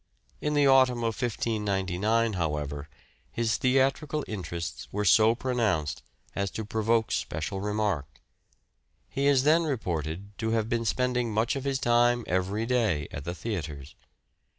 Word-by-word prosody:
In 150 0 0
the 145 -1 +4
autumn 130 -3 +4
of 115 -2 -2
1599, 105 -1 0
however, 75 -4 -3 0.4
his 115 -1 0
theatrical 135 +3 +1
interests 85 -4 -5
were 105 +1 -1
so 110 +3 +6
pronounced 110 - -1 0.3
as 100 0 -1
to 110 +2 -5
provoke 110 +1 +1
special 90 +5 -2
remark: 105 -8 -1 1.0
he 140 +1 -1
is 135 -2 +4
then 155 +3 +5
reported 95 - -3
to 110 -1 -1
have 110 -1 +1
been 115 0 -1
spending 125 0 0
much 110 +6 +1
of 135 0 -4
his 135 -1 +1
time 120 -1 +3
every 95 +5 -1
day 110 - +1
at 70 - -7
the 85 +1 -4
theatres. 75 - -5
110 Hz, 140 wpm, -28 LUFS, 90-125 Hz, 1.0 s, so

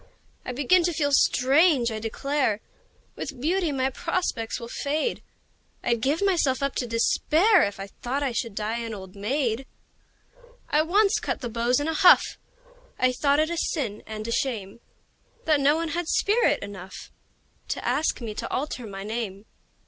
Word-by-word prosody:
I - - -4
begin 290 +8 +3
to 345 - 0
feel 290 -2 0
strange, 270 -1 +4
I 220 - -4
declare! 225 0 -1 0.6
With - - -6
beauty 340 +4 0
my 265 -1 0
prospects 330 -8 -2
will 235 - -7
fade 300 - -2 0.6
I'd 235 -2 0
give 290 - +1
myself 325 -9 +2
up 275 - 0
to 245 - -1
despair 320 - +3
If 200 -4 -1
I 195 - -4
thought 250 +7 -4
I 270 - 0
should 230 -2 -3
die 220 +3 -2
an 230 -2 -5
old 190 -1 -10
maid! 240 +3 -1 1.0
I 300 - +3
once 395 +6 +3
cut - - -3
the 240 - -4
beaux 235 +2 0
in 290 - -2
a 320 - 0
huff 355 +3 +7 0.7
I 255 0 +3
thought 280 +3 +2
it 315 +2 +1
a 340 - -2
sin 240 -11 -2
and 215 0 -6
a - - -3
shame 230 -6 -2 0.7
That 310 -2 +3
no 285 +2 +4
one 330 0 -2
had 340 0 -2
spirit 405 - +2
enough 190 -2 -9 0.6
To - - -3
ask 310 -3 0
me 225 -3 -4
to - - -5
alter 255 -4 -3
my 195 -1 -7
name. 210 -2 -4
265 Hz, 170 wpm, -25 LUFS, 225-310 Hz, 1.0 s, huff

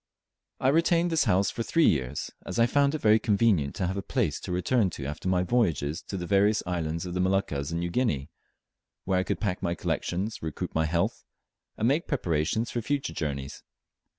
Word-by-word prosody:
I 130 - +3
retained 170 +3 +3
this 160 -4 +2
house 100 -2 +2
for 115 - -4
three 165 +7 +2
years, 65 -1 0
as - - -5
I 115 - +5
found 140 +4 +2
it 155 - -4
very 110 +1 +5
convenient 100 - +2
to 95 - -1
have 95 +2 -2
a - - -1
place - - -1
to - - -6
return 95 +4 +2
to 75 -5 -7
after 75 +6 -4
my 90 -1 +2
voyages 85 - 0
to 100 - -4
the 90 - -4
various 100 +3 +3
islands 85 -1 -2
of 90 - -5
the 90 - -2
Moluccas 90 -7 0
and 85 +1 -2
New 85 0 -2
Guinea, 80 - 0 0.7
where 95 -1 +2
I - - +1
could - - -2
pack 100 -4 -2
my 85 0 -1
collections, 95 +6 -2
recruit 80 -2 -4
my 80 0 +1
health, 85 +2 -1 0.5
and 110 - +1
make 145 +6 +1
preparations 90 - 0
for 120 - -2
future 140 +4 -2
journeys. 70 -3 -4
95 Hz, 205 wpm, -27 LUFS, 80-115 Hz, 0.7 s, I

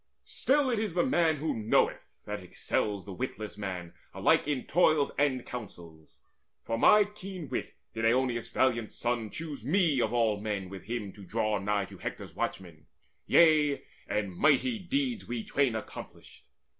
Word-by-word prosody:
Still 275 -1 +1
It 230 - +1
is 210 -6 -2
the 180 - +3
man 170 -10 +3
who 155 +2 -2
knoweth 110 -1 +1 0.2
that 105 -1 -4
excels 100 +2 -2
The 100 - -7
witless 110 -2 -5
man 95 -4 -5 0.2
alike - - +3
in 145 -4 -1
toils 155 -4 +3
and 135 -3 +1
counsels. 85 -9 -10 0.5
For 115 - -2
my 210 - +6
keen 195 -6 -8
wit 125 - -4 0.2
did 115 - -4
Oeneus' 120 0 +1
valiant 115 -4 +1
son 120 -2 -2
Choose 150 -2 -6
me 155 - +2
of - - +1
all 110 -4 +1
men 105 -3 -3
with 95 -1 -9
him 110 -3 -4
to 100 - -12
draw 105 +1 0
nigh 100 0 0
To - - -13
Hector's - - -6
watchmen: 85 -5 -5 0.4
yea, 155 -4 +5 0.2
and 100 -4 -2
mighty 155 - +3
deeds 250 +4 -2
We 120 -2 -3
twain 135 -5 +1
accomplished. 110 - -9
120 Hz, 160 wpm, -30 LUFS, 105-155 Hz, 0.5 s, my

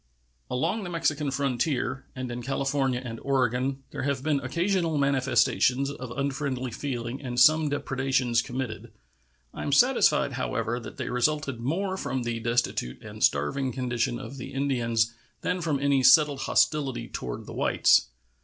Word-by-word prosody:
Along 130 - -1
the 180 - -5
Mexican 155 -4 0
frontier 135 0 -1
and 130 -1 -4
in 120 +1 -5
California 135 0 0
and 115 -1 -6
Oregon 135 0 0
there - - -5
have 135 -1 -1
been 150 -2 +1
occasional 170 +4 0
manifestations 135 0 +2
of 130 -3 -7
unfriendly 135 -2 -2
feeling 125 0 -4
and 125 -3 -3
some 155 +3 +6
depredations 135 -4 0
committed. 120 -3 -5 0.6
I - - -7
am - - -2
satisfied, - - +4
however, 115 +1 -2
that 115 - -10
they - - -4
resulted 140 0 0
more 185 +10 -1
from 130 -6 -2
the 120 -1 -2
destitute 115 - -1
and - - -6
starving 75 - +1
condition 125 -1 -1
of 140 - -8
the 125 - -8
Indians 120 -5 +1 0.3
than 180 0 -1
from 155 -4 0
any 140 -1 +2
settled 145 +2 +6
hostility 135 -7 +1
toward 60 -1 -6
the - - -9
whites. - - +3
135 Hz, 150 wpm, -27 LUFS, 120-140 Hz, 0.6 s, some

